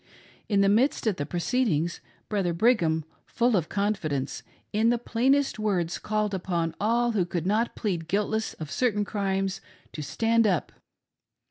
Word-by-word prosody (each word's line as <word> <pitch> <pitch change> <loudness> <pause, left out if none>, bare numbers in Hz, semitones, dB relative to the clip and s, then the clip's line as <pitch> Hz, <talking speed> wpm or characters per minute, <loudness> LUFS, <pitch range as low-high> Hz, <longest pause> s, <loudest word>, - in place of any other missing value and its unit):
In 200 -2 +3
the 200 - +4
midst 240 +8 +2
of 215 -4 +1
the 145 - -3
proceedings, 175 - 0 0.3
Brother 195 -5 0
Brigham, 170 -6 +2 0.2
full 240 -1 +2
of 170 -5 0
con 205 +1 +1
fidence, 145 -8 -3 0.3
in 220 +2 +3
the 240 - +3
plainest 255 +3 +1
words 185 -6 0
called 215 -1 -1
upon 170 -3 -1
all 235 +3 +2
who 205 -5 +1
could 175 -1 -3
not 220 +5 +1
plead 175 -6 -2
guiltless 210 +3 -1
of 155 -3 -7
certain 210 -5 +1
crimes 195 -2 -1 0.3
to 155 - -6
stand 225 +8 +2
up. 180 -6 0
205 Hz, 155 wpm, -27 LUFS, 175-225 Hz, 0.3 s, the